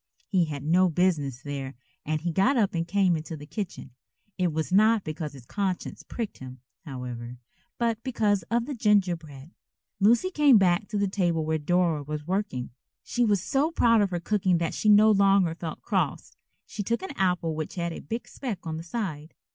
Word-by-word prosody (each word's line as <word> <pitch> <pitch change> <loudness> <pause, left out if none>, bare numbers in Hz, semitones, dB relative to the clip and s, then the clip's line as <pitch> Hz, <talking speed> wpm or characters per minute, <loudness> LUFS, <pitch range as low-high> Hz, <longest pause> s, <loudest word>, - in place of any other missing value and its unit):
He 185 -4 +2
had 145 -3 -6
no 180 +4 +4
business 150 -7 0
there 140 -2 -5 0.3
and 155 0 -1
he 170 +1 -1
got 195 - +2
up 210 -4 +2
and 165 -1 -2
came 190 -2 +2
into 160 +1 -5
the 145 - -10
kitchen. 175 - -6 0.4
It 180 -3 0
was 160 +3 -3
not 215 +2 +4
because 155 -1 -5
his 130 -3 -13
conscience 190 - -3
pricked 230 -4 -6
him, 130 0 -9 0.3
however, 125 -3 -6 0.4
but 230 -2 0
because 215 -6 +1
of 235 0 +1
the 290 - -4
gingerbread. 175 - 0 0.5
Lucy 235 - +4
came 295 -8 +6
back 190 +1 +2
to 210 - -3
the 200 0 +1
table 175 -5 0
where 160 0 0
Dora 170 0 +1
was 150 +1 -5
working. 185 -9 -2 0.3
She 245 - 0
was 205 -5 +2
so 275 +7 +1
proud 230 -9 +4
of 200 - +2
her 175 -1 -2
cooking 185 -1 +1
that 165 -2 -1
she 215 - +1
no 210 +1 +7
longer 195 -4 +4
felt 165 -1 -7
cross. - - -2 0.3
She 220 - -6
took 235 - -1
an 340 -7 -6
apple 180 -5 0
which 155 0 -5
had 170 -2 -2
a - - -7
big 230 +1 -5
speck 220 -11 -6
on 160 -1 -3
the 165 - -6
side. 165 -6 -5
180 Hz, 195 wpm, -27 LUFS, 155-210 Hz, 0.5 s, no